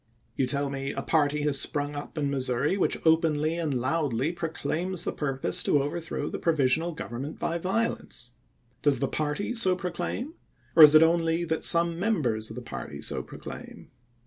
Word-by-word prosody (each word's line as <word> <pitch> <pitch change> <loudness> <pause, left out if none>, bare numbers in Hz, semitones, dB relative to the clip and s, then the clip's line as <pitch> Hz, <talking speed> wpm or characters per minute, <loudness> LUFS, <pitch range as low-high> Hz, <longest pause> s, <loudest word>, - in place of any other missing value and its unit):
You 130 - 0
tell 140 +1 -1
me 135 0 -4
'^ - - -12
a - - -2
party 150 -2 +1
has 145 -2 +4
sprung 145 -1 -1
up 145 +2 -8
in 145 -2 -1
Missouri 135 +4 +1
which 200 - 0
openly 160 -1 +2
and 165 -3 -2
loudly 135 +1 -1
proclaims 170 +1 -2
the - - -1
purpose 135 -3 0
to 145 - +2
over 150 +4 -3
turn 155 -2 -4
the - - -4
provisional 160 +1 +1
government 140 0 -6
by 170 +1 -2
violence." 180 - -2 0.5
Does 145 -3 +3
the 135 - -1
party 155 - -2
so 190 -6 +2
proclaim, 180 - -4 0.4
or 165 - +7
is 150 0 +10
it 155 - +8
only 165 0 +1
that 160 -1 -2
some 170 0 +5
members 130 - 0
of 110 - -9
the 125 - -7
party 65 - -7
so - - -2
proclaim? - - -10
155 Hz, 180 wpm, -27 LUFS, 140-170 Hz, 0.5 s, is